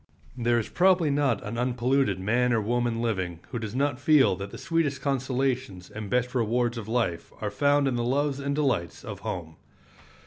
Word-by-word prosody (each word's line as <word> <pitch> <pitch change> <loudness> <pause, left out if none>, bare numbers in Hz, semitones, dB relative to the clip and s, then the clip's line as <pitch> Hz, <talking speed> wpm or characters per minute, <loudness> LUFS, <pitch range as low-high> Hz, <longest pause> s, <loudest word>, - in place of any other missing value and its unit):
There 120 -1 +1
is 115 - -1
probably 180 -4 +3
not 140 -6 +1
an 115 +3 -4
unpolluted 125 -3 +1
man 120 +5 +2
or 115 - +3
woman 120 +1 0
living 95 -7 -2
who 120 - -3
does 110 0 -5
not 140 -1 0
feel 145 - +4
that 100 +1 -6
the - - -9
sweetest 165 -4 0
consolations 130 -7 -2
and 105 -1 -6
best 125 +2 0
rewards 120 0 0
of 110 - -8
life 115 -7 -1
are - - -3
found 145 0 +2
in 125 -3 0
the 120 - 0
loves 140 +3 0
and 140 0 -2
delights 135 - -1
of - - -6
home. 80 -3 -5
125 Hz, 185 wpm, -27 LUFS, 110-140 Hz, -, feel